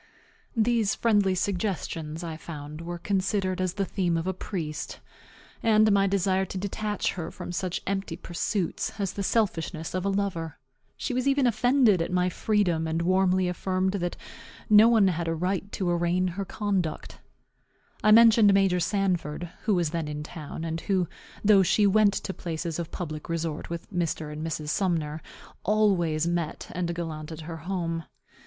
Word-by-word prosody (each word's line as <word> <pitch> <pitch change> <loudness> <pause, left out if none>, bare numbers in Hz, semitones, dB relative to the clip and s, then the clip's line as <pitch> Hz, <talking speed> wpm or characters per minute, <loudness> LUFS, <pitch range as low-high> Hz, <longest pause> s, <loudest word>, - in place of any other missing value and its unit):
These 225 -2 +2
friendly 205 -5 +3
suggestions, 180 -4 -2
I 165 -2 -4
found, 155 -1 -8
were 175 +1 -5
considered 190 0 0
as 185 -1 -1
the 195 - 0
theme 175 -3 0
of 165 - -2
a 190 - 0
priest, 165 -5 -5 0.6
and 215 -1 +5
my 195 0 +4
desire 190 -1 +1
to 190 0 -5
detach 205 +2 -2
her 170 -4 -5
from - - -7
such 180 0 -3
empty 195 0 -2
pursuits 180 +3 -2
as 195 -2 -1
the 200 - -4
selfishness 180 -6 -1
of 185 -1 -1
a 200 - +1
lover. 195 -5 -2 0.4
She 265 - -3
was 255 +2 0
even 275 -1 +3
offended 240 -4 +4
at 165 - -2
my 180 0 +2
freedom, 180 -5 +1
and 165 +1 -1
warmly 185 0 +3
affirmed 185 +1 0
that 175 -3 -2 0.5
no 215 +2 +8
one 220 -4 +5
had 170 -1 -2
a 165 - 0
right 190 +4 -2
to 180 -3 0
arraign 175 +1 +1
her 195 +3 -4
conduct. 190 -6 -2 0.8
I 215 - +5
mentioned 225 -1 +7
Major 190 -2 +3
Sanford, 175 -4 -1
who 215 -3 +3
was 170 -4 +1
then 165 -2 -2
in 150 0 -4
town, 160 0 -7
and 165 0 -3
who 190 -4 +1 0.4
(though 200 -2 +7
she 205 +3 +3
went 205 0 +4
to 190 - -3
places 165 -1 -4
of 170 -1 -4
public 155 -2 -6
resort 165 -2 -3
with 170 0 -5
Mr. 160 -3 -2
and 155 +1 -5
Mrs. 155 -2 -3
Sumner) 160 -4 0 0.4
always 180 -7 +2
met 170 -2 -2
and 175 -1 -2
gallanted 160 -1 -5
her 165 +1 -6
home. 165 -1 -3
180 Hz, 165 wpm, -27 LUFS, 165-200 Hz, 0.8 s, no